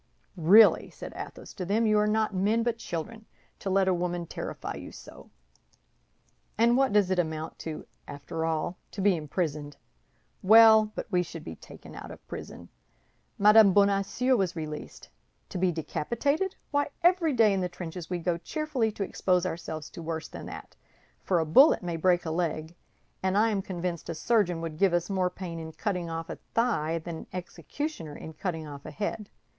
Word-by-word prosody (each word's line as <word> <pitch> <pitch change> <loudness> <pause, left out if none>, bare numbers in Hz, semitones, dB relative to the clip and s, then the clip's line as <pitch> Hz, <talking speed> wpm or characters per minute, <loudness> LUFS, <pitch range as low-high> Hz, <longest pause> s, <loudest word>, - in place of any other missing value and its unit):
"Really," 195 +6 +6
said - - -9
Athos - - -8
to 185 - -5
them, 210 +5 +1
"you 215 -1 +4
are 210 - +2
not 215 0 +1
men 210 +5 +1
but 235 -1 -1
children, 220 +5 -6 0.3
to 195 - -4
let 190 0 +3
a 190 - +4
woman 175 0 -2
terrify - - -6
you - - -8
so! - - -13 1.3
And 235 +2 +4
what 270 0 +3
does 200 -2 +3
it 185 - +2
amount 160 -1 -3
to, 160 -1 -6 0.2
after 145 +3 -5
all? 165 +2 -1 0.2
To 200 - -4
be 195 -1 +4
imprisoned. 150 -2 -3 0.6
Well, 220 +1 +7
but - - -4
we 180 -2 +3
should 165 -2 -7
be 80 - -7
taken - - -13
out - - -9
of - - -12
prison; - - -8 0.7
Madame 210 -1 +7
Bonacieux 200 +6 +3
was 190 -6 0
released. 155 -2 -7 0.4
To 180 - -4
be 185 0 +2
decapitated? 280 - -1 0.2
Why, 285 -1 +1 0.2
every 345 -3 +4
day 220 -4 +4
in 190 - 0
the 180 - -1
trenches 175 -1 -7
we 180 - -1
go 170 0 -1
cheerfully 265 - -1
to 205 - -3
expose 180 -2 0
ourselves 160 -3 -5
to - - -9
worse 160 0 -4
than - - -9
that—for 185 - -6
a 165 - +1
bullet 225 - +6
may 175 -1 -2
break 175 +1 +2
a 160 - -2
leg, 160 -1 -2 0.5
and 190 +1 +1
I 220 +2 +4
am 200 -2 0
convinced 175 -3 -4
a 165 - -3
surgeon 180 -2 +1
would 165 -2 -6
give 195 -3 +4
us 175 +3 -1
more 185 -2 +1
pain 175 -3 -7
in 160 0 -7
cutting 180 -4 -2
off 165 0 -4
a - - -7 0.2
thigh 185 -9 +1
than 165 0 -6
an - - -10
executioner 180 - -5
in 160 - -9
cutting 160 -1 -4
off 140 -1 -9
a - - -7
head. 210 0 -4
180 Hz, 185 wpm, -28 LUFS, 165-215 Hz, 1.3 s, Well